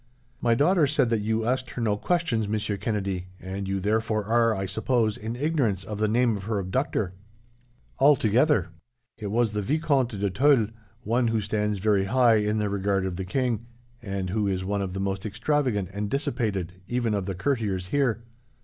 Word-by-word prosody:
"My 120 Hz, -1 st, +3 dB
daughter 155 Hz, +4 st, +4 dB
said 135 Hz, -4 st, +2 dB
that 115 Hz, -2 st, +1 dB
you 110 Hz, +1 st, 0 dB
asked 130 Hz, +1 st, 0 dB
her 125 Hz, -, -5 dB
no 105 Hz, -2 st, +2 dB
questions, 135 Hz, -, 0 dB
Monsieur 105 Hz, 0 st, -1 dB
Kennedy, 100 Hz, -3 st, -2 dB
and 95 Hz, +1 st, -5 dB
you 95 Hz, 0 st, -1 dB
therefore 110 Hz, +1 st, 0 dB
are, 115 Hz, +1 st, +3 dB
I 95 Hz, -, -2 dB
suppose, 110 Hz, +3 st, 0 dB
in 110 Hz, +2 st, -5 dB
ignorance 130 Hz, -, 0 dB
of 105 Hz, 0 st, -6 dB
the 110 Hz, -, +2 dB
name 115 Hz, +1 st, +2 dB
of 95 Hz, -2 st, -6 dB
her 110 Hz, -1 st, -1 dB
abductor?" 95 Hz, -1 st, -1 dB, 0.9 s
"Altogether." 130 Hz, -, +4 dB, 0.5 s
"It 105 Hz, -, -4 dB
was 115 Hz, +2 st, +1 dB
the 105 Hz, 0 st, -2 dB
Vicomte 135 Hz, -3 st, 0 dB
de 100 Hz, -1 st, 0 dB
Tulle, 125 Hz, 0 st, +4 dB, 0.3 s
one 120 Hz, +2 st, +1 dB
who 115 Hz, -1 st, +1 dB
stands 105 Hz, 0 st, -1 dB
very 100 Hz, 0 st, +2 dB
high 120 Hz, +1 st, +4 dB
in 105 Hz, 0 st, 0 dB
the 105 Hz, -1 st, 0 dB
regard 100 Hz, -1 st, 0 dB
of 95 Hz, -2 st, -3 dB
the 95 Hz, +1 st, -4 dB
king, 120 Hz, +2 st, -1 dB, 0.3 s
and 100 Hz, -4 st, -3 dB
who 105 Hz, 0 st, 0 dB
is 95 Hz, -1 st, -1 dB
one 100 Hz, +1 st, -1 dB
of 95 Hz, -2 st, -3 dB
the 95 Hz, -, -4 dB
most 95 Hz, 0 st, -2 dB
extravagant 115 Hz, -, 0 dB
and 100 Hz, 0 st, -3 dB
dissipated, 105 Hz, -, -1 dB
even 120 Hz, -3 st, 0 dB
of 100 Hz, -2 st, -2 dB
the 95 Hz, -, -3 dB
courtiers 100 Hz, -5 st, -1 dB
here. 125 Hz, -5 st, +1 dB
110 Hz, 185 wpm, -26 LUFS, 100-120 Hz, 0.9 s, daughter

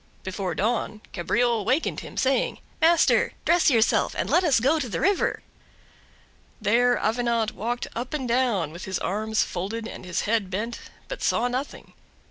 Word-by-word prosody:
Before 190 Hz, -2 st, -3 dB
dawn 220 Hz, +1 st, -1 dB
Cabriole 235 Hz, +5 st, +1 dB
wakened 260 Hz, +10 st, 0 dB
him, -, -, -10 dB
saying: 265 Hz, 0 st, +1 dB, 0.2 s
"Master, 335 Hz, +1 st, +4 dB
dress 345 Hz, -1 st, +4 dB
yourself 230 Hz, -4 st, +2 dB
and -, -, -1 dB
let 360 Hz, -, +4 dB
us 285 Hz, -8 st, +4 dB
go 280 Hz, +7 st, +2 dB
to 255 Hz, -5 st, -3 dB
the -, -, -3 dB
river." 395 Hz, 0 st, +1 dB, 1.2 s
There 245 Hz, +3 st, +3 dB
Avenant 230 Hz, 0 st, 0 dB
walked 240 Hz, +3 st, -3 dB
up 245 Hz, +2 st, -4 dB
and 285 Hz, -5 st, -2 dB
down, 230 Hz, -, +1 dB
with 175 Hz, +3 st, -8 dB
his 190 Hz, -1 st, -2 dB
arms 220 Hz, +2 st, 0 dB
folded 215 Hz, +6 st, -4 dB
and -, -, -9 dB
his 180 Hz, -2 st, -2 dB
head 215 Hz, -3 st, 0 dB
bent, 220 Hz, +5 st, -3 dB, 0.3 s
but -, -, -6 dB
saw 240 Hz, -, +1 dB
nothing. 255 Hz, +3 st, -5 dB
230 Hz, 160 wpm, -25 LUFS, 210-255 Hz, 1.2 s, Master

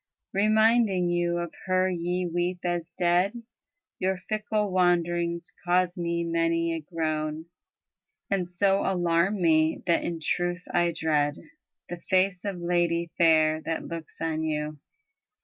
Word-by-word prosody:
Reminding 215 Hz, -3 st, +3 dB
you 175 Hz, 0 st, 0 dB
of 170 Hz, -1 st, -4 dB
her 185 Hz, 0 st, +2 dB
ye 180 Hz, 0 st, -1 dB
weep 175 Hz, +1 st, -2 dB
as 175 Hz, -1 st, -2 dB
dead. 180 Hz, +6 st, +1 dB, 0.6 s
Your 190 Hz, 0 st, 0 dB
fickle 210 Hz, +2 st, -2 dB
wanderings 175 Hz, -1 st, +1 dB
cause 180 Hz, 0 st, +2 dB
me 170 Hz, -1 st, -1 dB
many 165 Hz, 0 st, 0 dB
a 165 Hz, -, -2 dB
groan 155 Hz, -1 st, -3 dB, 0.9 s
And 185 Hz, -3 st, 0 dB
so 195 Hz, +2 st, +2 dB
alarm 180 Hz, +2 st, +1 dB
me, 160 Hz, -2 st, +2 dB
that 170 Hz, -2 st, +2 dB
in 170 Hz, -1 st, -3 dB
truth 175 Hz, +3 st, -1 dB
I 175 Hz, 0 st, +3 dB
dread 150 Hz, -3 st, 0 dB, 0.5 s
The 175 Hz, -1 st, -7 dB
face 185 Hz, 0 st, +2 dB
of 195 Hz, -3 st, -3 dB
lady 170 Hz, -1 st, 0 dB
fair 155 Hz, -2 st, +4 dB
that 165 Hz, 0 st, -3 dB
looks 165 Hz, -2 st, -8 dB
on 160 Hz, -1 st, -1 dB
you. 150 Hz, -1 st, -3 dB
175 Hz, 130 wpm, -27 LUFS, 165-185 Hz, 0.9 s, fair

